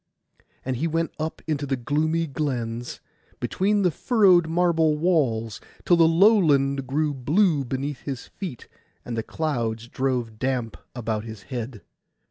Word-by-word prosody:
And 130 -1 -1
he 160 +7 0
went 165 +1 -1
up 160 +1 -4
into 145 -3 -2
the 135 - 0
gloomy 155 +6 0
glens, 120 -6 -3 0.4
between 205 +2 +1
the 180 - +3
furrowed 185 - +4
marble 165 -2 +2
walls, 130 - +1 0.2
till 175 - +5
the 165 -1 +5
lowland 155 - +4
grew 150 +3 0
blue 150 +4 +2
beneath 135 +2 -3
his 135 -4 -6
feet 175 - -8 0.4
and 120 - -4
the 115 - -1
clouds 115 -6 -2
drove 120 -4 -2
damp 125 -4 -1 0.2
about 110 -3 -3
his 110 -3 -9
head. 120 -2 -5
140 Hz, 140 wpm, -24 LUFS, 120-165 Hz, 0.4 s, till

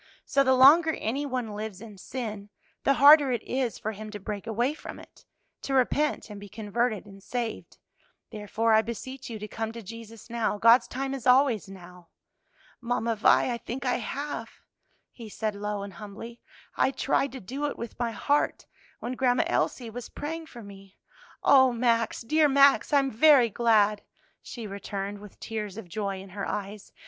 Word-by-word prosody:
So 275 - +2
the 260 -1 +3
longer 315 +5 +7
any 275 +6 -3
one 250 -5 -3
lives 210 -2 -6
in 215 -1 -11
sin, 210 -1 -6 0.3
the 275 - +3
harder 285 0 +7
it 240 -3 -2
is 255 -3 -2
for 220 - -4
him 215 0 -8
to 210 -1 -7
break 205 +1 -6
away 240 +5 0
from - - -9
it - - -16 0.4
to 270 - -2
repent 270 -1 +1
and 205 - -8
be 205 0 -11
converted 220 +1 -2
and 195 -1 -14
saved. 235 +2 -5 0.5
Therefore, 220 +2 0
I 220 - +6
beseech 245 +4 -7
you 225 - -5
to 210 0 -7
come 225 0 -4
to 230 -1 -8
Jesus 230 +2 -11
now; 230 -3 -1
God's 230 +4 +5
time 270 +1 -4
is 260 -2 -5
always 250 -6 +4
now." 180 -2 -13 0.7
"Mamma 235 -1 -1
Vi, 225 +3 +3
I 235 - -5
think 255 +4 -6
I 250 - +1
have," 255 -1 -5 0.6
he 230 -3 -11
said 215 0 -3
low 205 0 -4
and 200 -1 -8
humbly; 210 +6 -10 0.3
"I - - +3
tried 275 0 0
to 265 - -6
do 270 +9 -4
it 285 - -5
with 235 0 -8
my 240 -1 0
heart, 285 +6 0 0.4
when 245 - -4
Grandma 250 -1 +2
Elsie 235 -3 -1
was 245 +1 -8
praying 320 +2 -6
for 240 -6 -11
me." 195 -1 -14 0.5
"O 260 -2 +6
Max, 230 -1 0
dear 305 +5 +3
Max, 280 +2 +5
I 290 - +5
am 270 -1 +1
very 255 -1 +5
glad!" 215 -2 +3 0.4
she 235 -3 -8
returned 200 0 -5
with 205 -1 -14
tears 210 -3 -5
of 225 -5 -8
joy 195 +1 -3
in 195 +1 -11
her 200 +2 -5
eyes. 205 0 -6
230 Hz, 185 wpm, -27 LUFS, 210-260 Hz, 0.7 s, longer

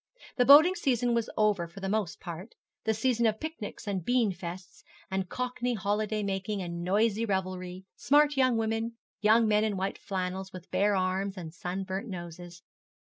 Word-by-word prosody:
The 245 - +4
boating 305 +7 +9
season 245 -8 +1
was 235 -1 0
over 210 -5 +2
for 170 +4 -12
the 195 - -3
most 205 -3 -1
part 175 +5 -8 0.3
the 220 - +2
season 235 +1 +2
of 215 0 0
picnics 310 -10 -6
and 190 -3 -2
beanfeasts, 185 -6 -2 0.3
and 190 -1 -2
Cockney 250 -1 -2
holiday 210 +1 -1
making, 195 +1 -2
and 170 -2 -4
noisy 210 +4 +2
revelry, 185 -2 -3
smart 295 +1 +4
young 255 -3 +3
women, 225 +1 -1 0.3
young 220 +2 +4
men 210 0 +3
in 210 -3 0
white 190 +1 -2
flannels, 190 0 -4
with 185 -1 -11
bare 205 +1 +2
arms 190 +1 -1
and 165 -3 -7
sunburnt 190 +4 -4
noses. 175 -2 -8
205 Hz, 165 wpm, -29 LUFS, 185-230 Hz, 0.3 s, boating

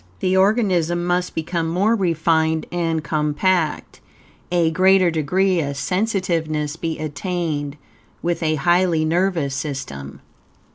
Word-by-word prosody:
The 185 0 +1
organism 190 -4 +2
must 180 0 -1
become 165 0 -2
more 195 +7 +2
refined 160 -4 +1
and 165 -3 -1
compact, 155 +3 0 0.5
a 170 -2 +2
greater 185 +1 +4
degree 180 +4 +1
of 140 -2 -3
sensitiveness 165 -4 -1
be 165 -1 -4
attained, 155 -2 -3 0.5
with 175 +1 -1
a 155 -1 +1
highly 175 +1 +2
nervous 165 -4 0
system. 100 - -6
165 Hz, 110 wpm, -21 LUFS, 155-180 Hz, 0.5 s, greater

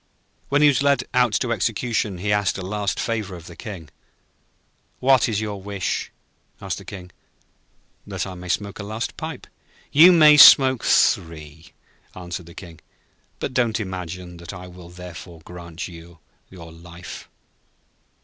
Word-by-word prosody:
When 145 +2 +3
he - - +8
was 140 -1 +3
led 140 0 +2
out 125 -3 +3
to 115 +3 0
execution 110 -1 -1
he 105 +3 -1
asked 105 -2 0
a 95 - -6
last 100 0 -2
favour 110 -5 -3
of 85 -2 -12
the 85 - -11
King. 95 - -9 1.1
'What 130 -1 +3
is 105 -2 -1
your 105 -2 -5
wish?' 100 -2 -3 0.5
asked - - -5
the - - -13
King. 90 -3 -10 1.0
'That - - -4
I 95 - -7
may 90 0 -10
smoke 100 +3 -2
a - - -5
last 110 +3 -5
pipe.' - - -7 0.5
'You 165 +6 +8
may 155 -3 +7
smoke 130 -3 +8
three,' 80 0 0 0.4
answered 90 -1 -7
the 85 - -14
King. 85 -4 -11 0.6
'But 130 - -5
don't 120 -3 +1
imagine 90 -3 -6
that 85 +2 -9
I 90 -1 -9
will 90 -1 -13
therefore 90 -1 -11
grant 85 -1 -8
you 85 0 -13 0.3
your 85 -3 -12
life.' 85 +1 -11
95 Hz, 155 wpm, -22 LUFS, 85-115 Hz, 1.1 s, he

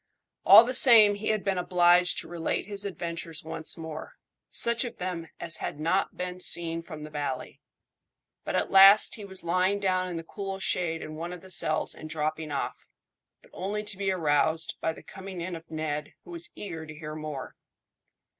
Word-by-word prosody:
All 225 - +11
the 250 +2 -3
same 225 -5 +8
he 205 +1 -5
had 215 -2 0
been 195 -2 0
obliged 180 0 +4
to - - -12
relate 170 -1 -2
his 200 0 -4
adventures 170 -4 -5
once 160 0 -5
more 160 -1 -8 0.3
such 235 +1 0
of 240 -2 -7
them 180 -3 -4
as 165 - -1
had 145 - -5
not 170 +5 0
been 180 0 -5
seen 165 -2 +1
from 155 -3 -9
the 150 - -9
valley. 145 -3 -5 0.8
But - - -3
at - - 0
last 195 +2 +8
he 215 - -6
was 190 -2 -3
lying 185 +4 +1
down 185 -2 0
in 175 - -4
the 165 - -6
cool 195 +2 -6
shade 170 -3 -2
in 155 - -8
one 170 +2 -5
of 180 -1 -8
the 190 - -10
cells 155 -3 +2
and 155 - -10
dropping 155 0 -3
off, 140 - -4 0.6
but - - -21
only 205 +3 -3
to 210 -1 -2
be 195 0 -2
aroused 160 -1 +1
by 160 - 0
the 160 - -12
coming 190 -1 -9
in 175 +1 -4
of 165 0 -11
Ned, 150 -1 -4
who 360 - -13
was 345 0 -5
eager 165 -6 -7
to 155 - -9
hear 155 -1 -7
more. 155 -3 -7
175 Hz, 195 wpm, -27 LUFS, 160-195 Hz, 0.8 s, All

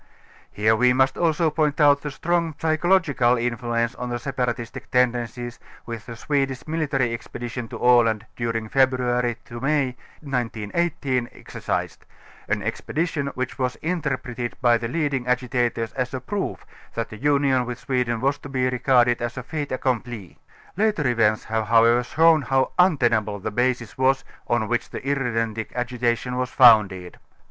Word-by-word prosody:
Here 110 +2 +2
we 125 +2 +4
must 130 +1 +2
also 165 -1 +1
point 150 -1 0
out 145 -1 +5
the 150 - -4
strong 165 +2 -1
psychological 155 -6 +2
influence 120 0 -1
on 125 -1 -5
the 120 - -2
separatistic 125 -1 -3
tendencies, 120 -1 0 0.3
which 115 -2 -7
the 115 - -7
Swedish 135 0 -2
military 140 -6 0
expedition 120 0 -6
to - - -7
Aland 115 -3 +3
during 115 -2 -2
Febr. 130 +2 +3
ŌĆö 120 -1 -2
May 135 -2 +1 0.3
1918 130 +1 -2
exercised - - -4 0.5
ŌĆö - - +2
an - - -7
expedition 155 -3 -2
which 130 +1 -4
was 125 -1 0
interpreted 130 -8 -3
by 120 -2 +4
the 115 0 -2
leading 135 -2 -1
agitators 125 -2 0
as 130 0 -2
a - - -3
proof 200 +10 -4 0.3
that 115 -1 -2
the 110 - -9
union 140 -1 +2
with 125 0 -4
Sweden 125 -2 -1
was 140 +2 +1
to 145 - -10
be 130 -1 0
regarded 125 -1 +3
as 120 +1 -3
a 125 - -4
fait 145 +1 -4
accompli. 120 -6 -3 0.4
Later 205 -7 +1
events 110 -3 +2
have 110 -1 -2
however 115 +2 +5
shown 160 +5 +4
how 135 0 +1
untenable 120 - +3
the 105 +2 -5
basis 125 0 -1
was 135 +1 +3 0.2
on 120 -2 +1
which 120 +1 -1
the - - -6
irredentic 115 -5 -1
agitation 125 0 -1
was 125 0 -1
founded. 105 -9 +5
125 Hz, 155 wpm, -23 LUFS, 120-140 Hz, 0.5 s, out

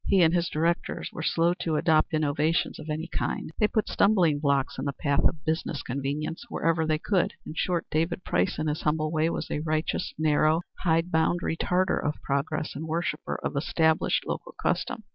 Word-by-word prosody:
He 190 -3 +5
and 165 0 +4
his 175 0 +1
directors 170 +2 -1
were 160 - -5
slow 165 +2 +2
to 160 -2 -1
adopt 155 0 +3
innovations 155 +1 +1
of 155 - -8
any 155 +2 -2
kind; 165 - -3
they 210 - +4
put 215 0 0
stumbling 180 -8 +3
blocks 140 -3 0
in 135 - -3
the 140 - -1
path 140 0 0
of 155 - 0
business 160 -2 -1
convenience 140 +5 -3
whenever 165 -5 +1
they 155 -1 +2
could; 185 +3 0
in - - -6
short, 175 0 0
David 165 +3 0
Price 90 +1 0
in 155 - -1
his 150 0 -1
humble 155 0 0
way 160 0 +2
was - - -4
a - - -1
righteous, 155 +1 -1
narrow, 155 +1 +3 0.2
hide 165 0 +1
bound 160 +2 +2
retarder 180 +3 +1
of 150 +1 -2
progress 145 +3 -2
and 155 +3 -5
worshipper 170 +3 -2
of - - -2
established 160 +2 +2
local - - -5
custom. 220 - -1
160 Hz, 190 wpm, -27 LUFS, 150-170 Hz, 0.2 s, He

